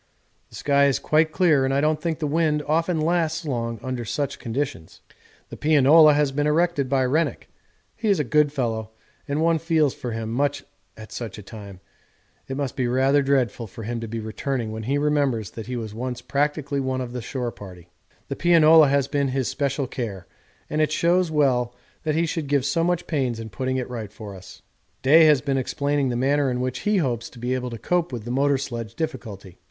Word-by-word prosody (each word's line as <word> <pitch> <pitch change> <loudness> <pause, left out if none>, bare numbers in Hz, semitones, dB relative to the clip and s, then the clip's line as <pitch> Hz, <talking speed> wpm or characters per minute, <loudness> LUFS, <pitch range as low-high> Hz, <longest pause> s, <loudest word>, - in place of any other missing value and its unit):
The - - -14
sky 140 -1 +3
is 135 - +2
quite 155 +1 +2
clear 155 -6 +3
and 135 - +1
I 135 - +2
don't 155 +1 +1
think 165 -1 -1
the 155 - -3
wind 150 0 +1
often 165 +2 +1
lasts 160 0 0
long 115 -5 -3
under 130 -2 -3
such 140 +4 -3
conditions. 120 - -4 0.5
The - - -9
pianola 155 +1 +6
has 145 -2 +2
been 145 +2 0
erected 150 -3 +1
by 135 -1 +2
Rennick. 155 +6 -1 0.5
He 225 - -3
is 200 - +3
a - - +2
good 145 +3 +2
fellow 115 -6 -2 0.4
and 145 +2 -1
one 165 -1 +3
feels 160 -3 +2
for 120 - -6
him 110 0 -4
much 145 +3 0 0.3
at 110 0 -11
such 115 -4 -6
a 105 - -9
time 100 -2 -11 0.7
it 135 - -4
must 140 -3 -3
be 125 -2 0
rather 135 +3 +3
dreadful 130 -5 0
for 110 +3 -10
him 115 +2 -3
to 115 - -5
be 115 +1 -4
returning 110 +2 -3
when 110 0 -5
he 140 - +2
remembers 140 -8 0
that 110 -1 -8
he 125 - -4
was 110 -3 -5
once 125 +2 -4
practically 140 +2 -1
one 130 -1 -1
of 125 -1 -5
the 125 - -4
shore 125 0 -4
party._11_ 90 -4 -15
The - - -2
pianola 160 -2 +6
has 140 -1 +2
been 140 -1 0
his 130 -1 -1
special 140 -1 -1
care, 110 -8 -5 0.4
and 155 - -1
it 155 - +1
shows 175 +2 +2
well 125 -6 +1 0.3
that 155 -1 0
he 165 +1 +2
should 160 -2 -3
give 140 -2 +1
so 155 +4 +1
much 175 0 0
pains 130 -7 -1
in 110 -1 -6
putting 130 +3 -2
it 125 - -3
right 115 -5 -6
for 105 -2 -9
us. 95 0 -13 0.4
Day 160 +5 +7
has 150 -4 +5
been 140 -2 0
explaining 140 +1 -1
the 120 - -2
manner 140 +3 +2
in 125 -1 -2
which 125 0 -2
he 210 - +3
hopes 120 - -1
to - - -17
be 125 +2 -2
able 125 -1 -2
to 115 - -6
cope 175 +5 0
with 115 -4 -6
the 120 - -4
motor 140 +2 +2
sledge 115 -4 -6
difficulty. 110 - -6
135 Hz, 215 wpm, -24 LUFS, 120-150 Hz, 0.7 s, Day